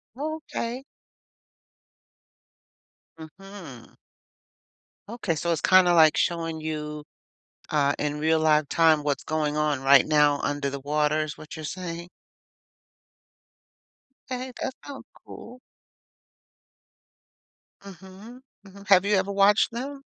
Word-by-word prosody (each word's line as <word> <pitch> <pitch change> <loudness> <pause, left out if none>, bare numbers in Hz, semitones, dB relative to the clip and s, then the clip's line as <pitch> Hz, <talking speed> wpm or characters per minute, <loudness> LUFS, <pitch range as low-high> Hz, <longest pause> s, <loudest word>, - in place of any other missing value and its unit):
Oh, 310 +3 -4 0.2
okay. 245 +3 -4 2.3
Mhm. 165 - -12 1.1
Okay, 220 -8 -3
so, 170 +2 -2
it's 160 - 0
kinda, 185 -2 +5
like, 160 -2 +5
showing 165 -2 -1
you, 150 -1 -5 0.7
uh, 145 -2 +2
in 150 0 -2
real 160 +1 +2
live 155 -1 +3
time 160 -3 +3
what's 145 -1 -2
going 155 -1 -2
on 150 -3 0
right 135 -1 +5
now 150 -2 +3
under 145 -1 -2
the 140 0 -6
water 150 +2 0
is 155 -1 -6
what 155 - -11
you're 155 - -8
saying? 170 0 -7 2.2
Hey, 255 0 -5
that 265 - -3
sounds 280 -2 -10 0.2
cool. 250 +1 -12 2.2
Mhm. 195 +6 -13 0.2
Mhm 200 0 -15
have 190 -2 +5
you 205 0 +2
ever 190 +1 0
watched 200 +3 +3
them? 275 +4 -6
165 Hz, 115 wpm, -25 LUFS, 150-200 Hz, 2.3 s, kinda